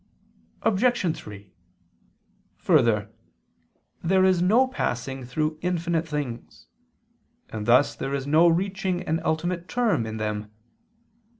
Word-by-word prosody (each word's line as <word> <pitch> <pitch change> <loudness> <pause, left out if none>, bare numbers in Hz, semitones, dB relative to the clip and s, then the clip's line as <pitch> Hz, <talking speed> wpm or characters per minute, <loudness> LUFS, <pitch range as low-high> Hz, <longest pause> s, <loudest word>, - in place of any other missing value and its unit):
Obj. 210 -5 +2
3: 100 -2 -11 1.0
Further, 105 -2 +2 0.9
there 190 +2 +3
is 185 -2 +3
no 225 +9 +4
passing 135 - -3
through 155 +5 -2
infinite 170 -2 -1
things: 145 -6 -6 0.8
and 105 0 -6
thus 125 +4 +5
there 135 +1 -3
is 135 -1 -3
no 155 +4 +5
reaching 185 +1 0
an 165 -1 -1
ultimate 170 +2 -1
term 230 - 0
in 110 0 -5
them. 105 -1 -3
160 Hz, 110 wpm, -25 LUFS, 120-185 Hz, 1.0 s, thus